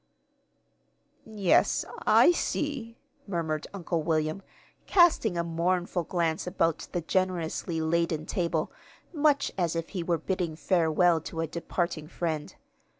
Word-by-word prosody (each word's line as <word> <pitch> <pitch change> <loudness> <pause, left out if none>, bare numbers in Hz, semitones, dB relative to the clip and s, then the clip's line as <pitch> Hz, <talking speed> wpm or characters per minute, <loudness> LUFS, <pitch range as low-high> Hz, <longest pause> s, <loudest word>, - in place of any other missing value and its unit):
"Yes, 205 -5 +2 0.2
I - - +7
see," 275 -8 -2 0.3
murmured 160 -5 -2
Uncle 175 -4 -2
William, 155 +2 0 0.5
casting 320 - +4
a 170 - +1
mournful 175 +1 -1
glance 170 -1 -1
about 165 -2 0
the 175 - -1
generously 170 -2 -1
laden 160 -1 0
table, 170 -5 -1 0.4
much 295 -2 +2
as 170 -2 0
if 165 0 -3
he 185 - -4
were 170 0 0
bidding 170 -1 -2
farewell 170 -1 +2
to 160 +1 -5
a - - 0
departing 170 -1 -3
friend. 160 -3 -3
170 Hz, 120 wpm, -28 LUFS, 160-185 Hz, 0.5 s, I